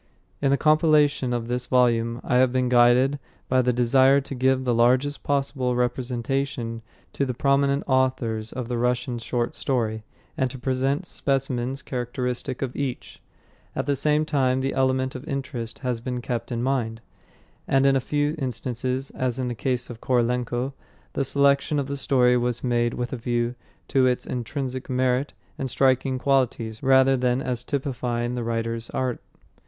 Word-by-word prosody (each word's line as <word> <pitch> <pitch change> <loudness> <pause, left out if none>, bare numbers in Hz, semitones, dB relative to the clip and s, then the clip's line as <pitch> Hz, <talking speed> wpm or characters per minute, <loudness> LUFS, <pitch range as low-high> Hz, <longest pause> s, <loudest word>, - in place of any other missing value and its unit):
In 140 - +2
the 140 - +3
compilation 150 -4 +3
of 120 -1 -2
this 125 +1 -2
volume 115 -2 +2
I 125 - +1
have 130 0 +4
been 130 -1 +1
guided 125 +3 +4 0.3
by 130 0 +3
the 125 0 +2
desire 130 +3 +4
to 140 0 -6
give 130 0 +2
the 125 -2 +1
largest 125 +5 +2
possible 135 -3 0
representation 125 0 -2 0.3
to - - -1
the 130 -3 -2
prominent 140 +1 +2
authors 130 -4 0
of 125 -2 -5
the 120 -1 -2
Russian 125 0 0
short 120 +1 -2
story, 110 -5 -1 0.3
and 130 - 0
to 130 - -8
present 135 +6 -1
specimens 135 -3 -2
characteristic 125 +1 -3
of 130 -2 -4
each. 135 -3 -5 0.5
At - - -1
the 140 0 +1
same 150 +2 +2
time 130 -4 +1
the 135 +1 -1
element 130 0 +1
of 135 +2 -8
interest 130 -5 -4
has 120 -2 -1
been 125 0 -3
kept 120 -1 -4
in 120 0 -2
mind; 120 -4 -1 0.7
and 135 0 +3
in 135 0 +5
a - - +3
few 145 +3 0
instances, 130 0 -3
as 130 -1 -2
in 130 -1 -2
the - - -2
case 125 +1 -2
of 115 - -10
Korolenko, 125 +1 0 0.4
the 140 - 0
selection 140 +2 +2
of 140 - 0
the 140 +1 -4
story 125 -3 +3
was 120 -1 -1
made 120 -1 +1
with 125 0 -3
a - - -2
view 120 0 -1 0.4
to 130 -1 +4
its 125 -1 0
intrinsic 130 +2 -4
merit 130 +2 0 0.2
and 135 - -2
striking 130 0 +2
qualities 125 -5 0
rather 135 0 +5
than 125 0 +1
as 125 -3 -3
typifying 125 -3 -2
the 125 -1 -3
writer's 115 0 -3
art. 130 -2 -2
130 Hz, 170 wpm, -24 LUFS, 120-135 Hz, 0.7 s, in